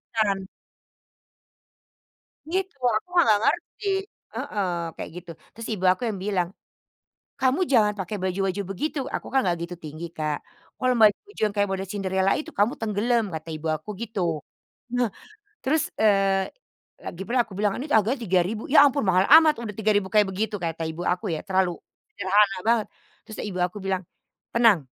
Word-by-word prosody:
kan. 210 -3 +2 2.1
Gitu, 375 +2 -2 0.2
aku 215 - -2
enggak 220 -10 +6
ngerti 410 - -1 0.5
heeh, 200 -3 -2 0.3
kayak - - -6
gitu. 175 -1 -8 0.2
Terus 230 0 -7
Ibu 190 -3 -3
aku 185 - -17
yang 200 -3 -4
bilang, 185 -4 0 0.9
"Kamu 265 +7 +2
jangan 210 -4 +5
pakai 190 +2 -3
baju-baju 190 +1 -1
begitu," 295 - -3 0.2
aku - - -3
kan 265 - +4
enggak 175 -1 +2
gitu 175 +1 -7
tinggi, 155 +3 -6
Kak. 155 -2 -2 0.4
"Kalau 255 0 +2
baju-baju 225 - +3
yang 210 - -3
kayak 205 -1 +1
boleh 195 0 -2
cinderella 190 -1 +1
itu 310 +2 -5
kamu 210 +5 +3
tenggelam," 225 +2 +1
kata 160 +1 -6
ibu 155 - -8
aku 155 +7 -5
gitu. 220 -4 -4 0.7
Nah, 245 -1 +2 0.6
terus, 295 +3 +1
eee, 195 -2 +3 0.5
lagi 175 - -7
pula 245 +3 +2
aku 215 - -14
bilang, 205 -1 +1
"Ini 300 - -5
harganya 225 +5 +2
3000," 190 +1 0
"Ya 290 - +9
ampun 280 0 +2
mahal 185 +1 +4 0.2
amat 310 -1 +4
udah 210 -3 -5
3000 205 -2 +1
kayak 210 -2 +5
begitu," 210 +3 -2
kata 165 -1 -3
ibu 160 +2 -5
aku 180 0 0
ya, 155 - -3
terlalu 190 -2 +2 0.4
sederhana 200 - +3
banget. 230 -2 +3 0.4
Terus 215 - -9
tuh - - -4
ibu 185 -2 -5
aku 180 +3 -7
bilang, 190 -1 -1 0.5
"Tenang, 225 - +4
205 Hz, 165 wpm, -25 LUFS, 185-230 Hz, 2.1 s, Ya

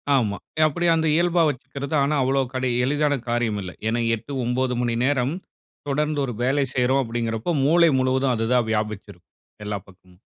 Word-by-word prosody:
ஆமா. 105 -6 +1 0.2
ய - - +4
அப்படி 175 +4 -2
அந்த 160 0 +1
இயல்பா 175 0 +2
வச்சுக்கிறது, 140 +2 -5
ஆனா 150 +2 +1
அவ்வளோ 135 +1 +2
கடி 130 0 -1 0.2
எளிதான 145 0 +1
காரியம் 120 -3 0
இல்ல. 90 -1 -6 0.2
ஏன்னா 115 +2 0 0.2
8, 115 +6 -11
9 125 +1 0
மணி 120 -1 0
நேரம் 135 0 +1 0.6
தொடர்ந்து 150 +1 0
ஒரு 125 - -4
வேலை 135 +2 +2
செய்றோம் 130 +2 +2
அப்படீங்கிறப்போ, 115 +5 -2
மூளை 170 +2 +5
முழுவதும் 130 0 +1
அதுதான் 115 +1 +1
வியாபிச்சு 105 -2 -2
இருக்கும், - - -29 0.3
எல்லா 105 -1 -3
பக்கமும். 90 -1 -20
130 Hz, 170 wpm, -23 LUFS, 115-145 Hz, 0.6 s, மூளை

